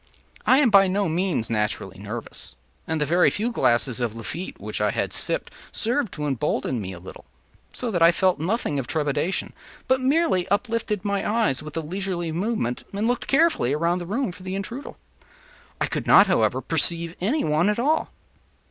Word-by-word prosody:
I 260 - +6
am 270 -5 +4
by 195 -1 +7
no 195 +1 0
means 165 -7 0
naturally 105 -2 -2
nervous, - - -7 0.3
and 160 -1 -1
the 150 - +1
very 175 +5 +4
few 225 +4 -1
glasses 125 - +1
of 120 -3 -2
Lafitte 140 - -6
which - - -5
I - - +3
had - - -2
sipped - - -1 0.2
served 235 -2 0
to 150 - -4
embolden 135 -3 -1
me 95 -1 -5
no - - -8
little, 90 -5 -11 0.5
so 245 -2 -3
that 175 -4 -1
I 165 +1 +8
felt 185 -1 +1
nothing 165 - -1
of 125 - -4
trepidation, 150 +4 -1 0.3
but 260 0 +2
merely 265 - +2
uplifted 210 -1 -1
my 200 -1 0
eyes 220 - +1
with 155 +1 -8
a - - 0
leisurely 175 0 -3
movement, 175 - -2
and 205 +3 -1
looked 245 0 -1
carefully 275 - +3
around 170 +4 +1
the 175 - -7
room 230 +2 -1
for 180 - -13
the 185 +1 -4
intruder. 230 +8 -5 0.9
I - - +2
could - - -4
not, - - +8
however, - - +1
perceive 170 0 +1
any 260 - +1
one 155 +6 +2
at 210 - 0
all. 295 +7 +1
180 Hz, 185 wpm, -24 LUFS, 150-220 Hz, 0.9 s, I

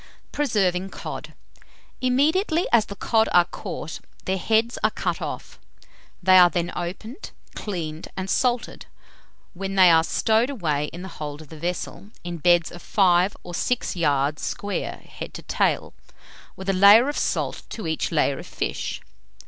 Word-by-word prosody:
PRESERVING 195 -10 0
COD. - - -7 0.7
Immediately 315 +8 +2
as 225 -2 +4
the 200 - -7
cod 220 +2 +2
are 175 -1 +6
caught, 165 - -6 0.3
their 190 0 0
heads 225 +4 +1
are - - +5
cut - - -3
off. - - -6 0.6
They 185 0 +7
are 175 -1 +8
then 175 +1 -2
opened, 205 - -6 0.2
cleaned, 165 -6 -5
and 190 0 -3
salted, 245 +3 -1 0.7
when 195 +1 -4
they 185 -2 +7
are 160 0 +5
stowed 220 +8 +2
away 155 - -1
in 175 +4 -8
the - - -6
hold 150 -1 -5
of 150 - -18
the 160 - -11
vessel, 180 +4 -4
in 175 0 -5
beds 175 0 +3
of 175 - -10
five 185 -1 +3
or 175 - -8
six 245 +6 -1
yards 145 -3 +1
square, 205 0 -4
head - - -8
to - - -8
tail, - - 0 0.6
with 190 - -9
a 195 - +2
layer 200 +6 +7
of 290 - -2
salt - - -1
to 220 - -6
each 160 -1 -1
layer 145 -4 +1
of - - -9
fish. - - -4
185 Hz, 160 wpm, -24 LUFS, 170-220 Hz, 0.7 s, are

